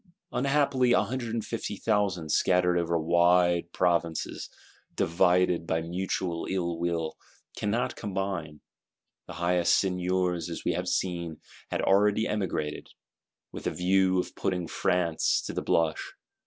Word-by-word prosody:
Unhappily, 135 -1 +2
a 95 - +4
hundred 120 +2 -4
and 115 -2 -2
fifty 110 -2 -4
thousand, 95 -8 0
scattered 90 -1 +3
over 85 -1 +1
wide 85 +1 +3
Provinces, 85 -2 -1 0.5
divided 90 0 +2
by 80 0 0
mutual 90 0 -3
ill 85 -3 -2
will, 85 -2 -2 0.4
cannot 110 +4 -1
combine. 95 -6 -4 0.7
The - - -8
highest 85 +1 +2
Seigneurs, 90 -2 0
as 85 - -6
we - - +2
have 90 +2 -3
seen, 85 -4 -2 0.3
had - - -2
already 105 +2 +3
emigrated,—with 90 -8 -6
a - - 0
view 95 +1 +2
of - - -3
putting 90 -3 -2
France 85 -2 +1
to - - -4
the - - -2
blush. 80 -1 0
90 Hz, 130 wpm, -28 LUFS, 85-95 Hz, 0.7 s, a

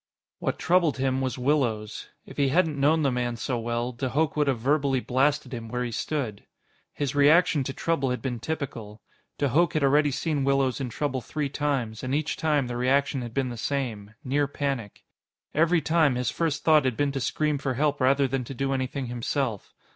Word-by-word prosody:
What - - -2
troubled 175 -5 +2
him 130 0 0
was 130 -1 -2
Willows. 125 -6 -1 0.2
If - - -12
he 140 - +3
hadn't 160 -1 +2
known 155 +3 +3
the 140 - +2
man 120 -1 -1
so 120 +1 -2
well, 120 +1 -2
de 125 +2 -3
Hooch 150 +3 0
would 150 -1 +1
have 135 -3 +2
verbally 140 +1 +1
blasted 140 +4 0
him 115 -2 -5
where 125 +1 -2
he 120 - -3
stood. 115 -4 -3 0.5
His 140 -2 -3
reaction 145 +1 +4
to 135 - -2
trouble 140 -2 -1
had 125 - -1
been 125 -3 -3
typical. 115 -8 -5 0.3
De 140 - +1
Hooch 165 +5 +3
had 155 - +1
already 145 +2 +4
seen 145 +1 -1
Willows 135 -1 +1
in 130 - -3
trouble 130 +1 -2
three 150 +3 -3
times, 135 -6 -2
and 130 +2 -1
each 155 0 -1
time, 150 -4 +1
the 120 0 -4
reaction 135 +2 +1
had 120 -2 -7
been 135 -2 0
the 120 - -6
same: 110 -5 -3
near 145 +2 +1
panic. 135 -7 -4 0.5
Every 165 +2 +3
time, 160 -3 +3
his 125 -1 -1
first 150 -3 -1
thought 155 -2 +5
had 125 -3 0
been 145 -1 +1
to 135 - -3
scream 150 +2 0
for 135 -2 -2
help 145 +1 0
rather 135 +2 +4
than 130 0 -2
to 135 - -7
do 135 +2 -1
anything 130 +1 -2
himself. 120 -2 -3
135 Hz, 205 wpm, -26 LUFS, 125-145 Hz, 0.5 s, thought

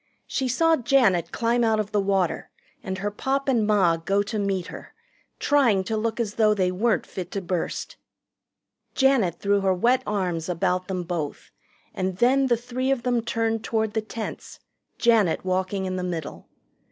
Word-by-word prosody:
She 265 - -2
saw 325 +6 +3
Janet 220 - +2
climb 235 +1 +1
out 220 -1 +2
of 210 0 -3
the 205 -1 +2
water 195 -3 0 0.3
and 190 0 -4
her 205 +2 -2
Pop 270 +6 -2
and 235 -6 +2
Ma 190 -6 +3
go 195 +5 0
to 215 +1 -4
meet 195 -3 -1
her, - - -11 0.4
trying 245 -10 +3
to 220 +4 -3
look 225 +2 -2
as 215 -3 -1
though 215 -1 +3
they 185 -2 +1
weren't 215 +5 +1
fit 180 -2 -7
to 200 - -1
burst. 180 -2 -4 1.0
Janet 265 - +3
threw 200 0 +1
her 190 -1 +2
wet 245 +8 +2
arms 180 -5 -2
about 180 +1 0
them 185 -2 -3
both, 165 -4 -5 0.4
and 185 -1 -2
then 265 +5 +3
the 240 -2 +2
three 250 +2 -3
of 270 -3 0
them 245 -2 +1
turned 225 -1 -1
toward 220 -2 -1
the 220 - 0
tents, 220 +1 -7 0.4
Janet 220 -8 +2
walking 185 +1 -1
in 185 0 -3
the 180 - -3
middle. 170 -4 -5
205 Hz, 175 wpm, -24 LUFS, 185-235 Hz, 1.0 s, saw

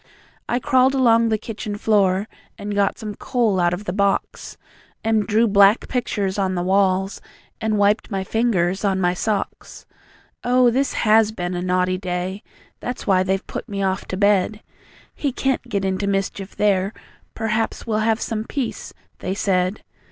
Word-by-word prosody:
I 240 - +1
crawled 260 0 +3
along 230 -3 +4
the 220 - +2
kitchen 210 -1 -6
floor, 200 -2 +2 0.3
And 205 0 -5
got 200 -1 +1
some 215 -2 -6
coal 220 -3 0
out 175 -1 +3
of 180 +4 -4
the 180 - -2
box, 200 0 -1 0.5
And 220 -1 +1
drew 225 +2 +3
black 200 +1 +5
pictures 205 -6 -2
on 190 -1 0
the 175 - -1
walls, 190 +1 +1 0.4
And 220 -1 0
wiped 205 +2 +2
my 195 -3 -2
fingers 190 -4 0
on 195 -2 +1
my 180 -1 +2
socks. 205 +2 -3 0.6
Oh, 250 0 +4
this 270 +3 0
HAS 220 0 +4
been 175 -3 -3
a 175 - -2
naughty 185 0 0
day! 185 +1 -3 0.4
That's 245 0 -5
why 190 -3 +3
they've 190 +1 -1
put - - -7
me 200 -1 -2
off 190 0 -1
to 185 - -4
bed. 205 +1 +2 0.5
"He 285 - -2
CAN'T 260 -1 -1
get 200 -3 -1
into 190 +1 -1
mischief 195 0 -2
there, 200 0 +1 0.4
Perhaps 225 0 -1
we'll 220 -2 0
have 220 +1 +1
some 220 -3 -3
peace," 265 -3 -4 0.2
they 190 - -3
said. 185 0 0
205 Hz, 165 wpm, -21 LUFS, 190-225 Hz, 0.6 s, black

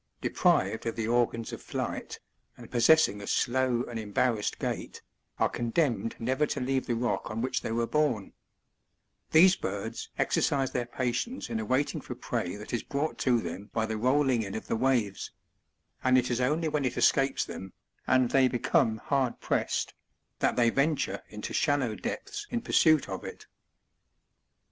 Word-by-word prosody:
deprived - - +1
of 115 - -2
the 115 -1 -2
organs 115 -1 0
of - - -7
flight, - - -4 0.4
and - - -12
possessing 120 -4 +4
a 100 - -8
slow 125 -1 +1
and 120 -2 -5
embarrassed 110 +1 0
gait, - - -4 0.4
are - - +3
condemned 115 -2 -1
never 130 +6 0
to - - -3
leave 130 +1 -1
the 120 - 0
rotk 120 +1 -1
on 110 0 -4
which 125 +1 -1
they - - -4
were 115 +1 +1
born 130 -7 0 1.0
These 180 +4 +7
birds 100 - -5
exercise 135 -2 +1
their 120 -1 -2
patience 125 - -3
in 110 - -1
awaiting 130 +6 0
for - - -7
prey 90 - -3
that 105 +3 -9
is 120 - 0
brought 145 +3 -3
to 125 -3 +3
them 95 +4 -6
by 110 -1 +1
the 110 0 -3
rolling 130 +1 +2
in 100 -3 -5
of 110 - -5
the - - -1
waves; 115 -5 0 0.7
and 130 0 +5
it 125 0 +1
is 120 +1 0
only 155 +6 +1
when 150 -2 0
it 125 -2 -1
escapes 135 0 +3
them, 95 0 -8 0.4
and 130 -2 +3
they 135 -1 +5
become 115 -3 +1
hard 130 +1 -1
pressed, - - -1 0.5
that - - +2
they 120 -1 +3
venture 140 -9 0
into 105 0 -6
shallow 140 -6 +1
depths 405 - -5
in 235 - -2
pursuit 155 -7 +4
of - - -5
it. - - -9
125 Hz, 165 wpm, -29 LUFS, 115-135 Hz, 1.0 s, These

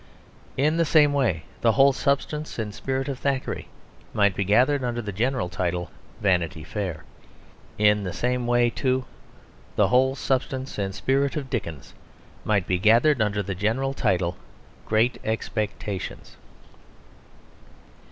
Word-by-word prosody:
In 150 +4 +2
the 170 - +4
same 150 -2 +4
way 115 - +1 0.2
the 115 -1 +4
whole 140 0 +5
substance 150 +3 -1
and 110 -3 -3
spirit 135 +4 -2
of 135 -2 -4
Thackeray 140 -2 -2 0.5
might 100 -2 +4
be 100 - 0
gathered 125 +8 +3
under 120 -1 -2
the 105 -3 -4
general 120 +1 0
title 90 -1 -2 0.3
Vanity 90 -4 +1
Fair. 95 0 -4 0.7
In 105 -1 +4
the 90 - -3
same 125 +2 -1
way 120 0 +3
too 130 0 0 0.7
the - - +3
whole 130 +2 +3
substance 130 -2 -2
and 95 -1 -2
spirit 135 +4 +1
of 135 -3 -5
Dickens 85 - -4 0.5
might 100 -4 +1
be 90 -1 0
gathered 115 +7 +4
under 105 -1 0
the 100 0 -3
general 115 +8 0
title 90 -7 0 0.5
Great 115 +3 +2
Expectations. 105 -3 -4
115 Hz, 135 wpm, -25 LUFS, 100-135 Hz, 0.7 s, whole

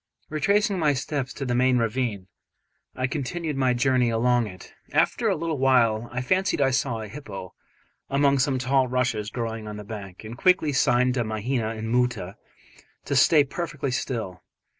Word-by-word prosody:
Retracing 200 +5 +1
my 150 -3 +3
steps 135 0 -3
to 135 - -5
the 125 - -1
main 125 +1 +3
ravine, 115 -4 -1 0.7
I 130 - -1
continued 150 +3 -3
my 130 -2 +2
journey 125 -1 +2
along 120 0 +2
it. 95 -3 -12 0.2
After 230 -2 +2
a 195 - +2
little 160 -3 -3
while 120 -4 +3
I 125 +1 -3
fancied 190 +6 +1
I 135 -1 +3
saw 125 -3 -1
a 110 - -6
hippo 100 - -8 0.6
among 140 0 +3
some 135 0 +2
tall 130 +1 +2
rushes 120 -4 -1
growing 115 -2 -4
on 105 0 -6
the 105 - -7
bank, 100 -3 -8
and 110 +2 -7
quickly 170 +1 +3
signed 125 -1 +3
to 125 -2 0
Mahina 110 +1 -2
and 110 +1 -4
Moota 125 -7 0 0.7
to 140 - -1
stay 145 +3 +6
perfectly 145 -1 -4
still. 115 -8 -3
125 Hz, 170 wpm, -25 LUFS, 115-140 Hz, 0.7 s, stay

